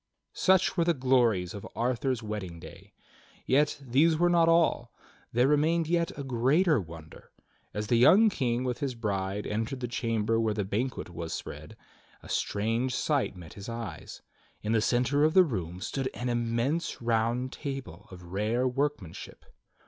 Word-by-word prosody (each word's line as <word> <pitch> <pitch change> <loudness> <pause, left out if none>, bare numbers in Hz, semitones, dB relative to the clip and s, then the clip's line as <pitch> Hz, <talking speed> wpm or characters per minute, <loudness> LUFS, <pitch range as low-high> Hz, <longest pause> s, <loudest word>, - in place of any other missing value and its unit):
Such 190 -1 +3
were 170 - +2
the 170 0 +2
glories 120 -9 +2
of 100 - -7
Arthur's 125 0 -1
wedding 100 -6 -5
day. - - -13 0.5
Yet, 145 +3 +2
these 140 +5 +2
were 175 +1 +3
not 165 -1 +4
all. 165 -8 +2 0.4
There 120 +3 +3
remained 160 +3 +2
yet 170 0 +1
a 140 - -4
greater 135 - +2
wonder. 80 -2 -12 0.4
As 105 +1 -3
the 120 +2 +2
young 185 - +7
King 125 -6 -1
with 125 -1 -2
his 135 -3 -2
bride 100 -3 -2
entered 115 +5 -3
the 125 - -3
chamber 115 -2 0
where 110 -2 0
the 105 -2 -1
banquet 110 -1 -3
was 85 -1 -5
spread, - - -8 0.5
a - - -12
strange 115 +5 -1
sight 145 -9 0
met 85 -3 -11
his 100 +2 -9
eyes: 115 -1 -7 0.4
In 105 - -1
the 115 -1 +3
centre 125 +6 +2
of 155 +1 +3
the 185 - +8
room 90 - -4
stood 135 +6 -2
an 125 +1 -3
immense 120 +8 -1
round 120 +2 0
table 135 - -7
of 90 -1 -11
rare 105 +8 0
workmanship. 125 - -4
120 Hz, 165 wpm, -29 LUFS, 105-140 Hz, 0.5 s, the